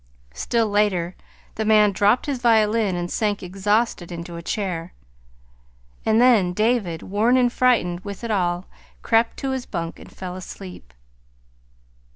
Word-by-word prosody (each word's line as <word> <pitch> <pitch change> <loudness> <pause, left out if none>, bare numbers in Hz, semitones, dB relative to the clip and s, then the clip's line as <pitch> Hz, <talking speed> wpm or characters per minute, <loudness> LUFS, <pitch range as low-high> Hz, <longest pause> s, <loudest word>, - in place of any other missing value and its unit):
Still 230 - 0
later, 205 -4 +1 0.4
the 220 - -3
man 215 -1 +5
dropped 205 +5 +2
his 280 -4 -2
violin 220 -4 +3
and 175 0 -3
sank 210 -3 -1
exhausted 195 0 0
into 170 0 -7
a 170 - -6
chair; 175 -2 -3 1.1
and 220 +1 +4
then 225 -8 +4
David, 210 -5 0
worn 220 +6 +2
and 245 -1 +2
frightened 220 -9 +2
with 200 +3 -8
it 230 - -3
all, 175 -3 0 0.4
crept 225 +1 +2
to 270 -1 -3
his 260 -2 -4
bunk 165 -3 -5
and - - -13
fell 185 -1 -7
asleep. 185 - -10
205 Hz, 145 wpm, -22 LUFS, 180-225 Hz, 1.1 s, man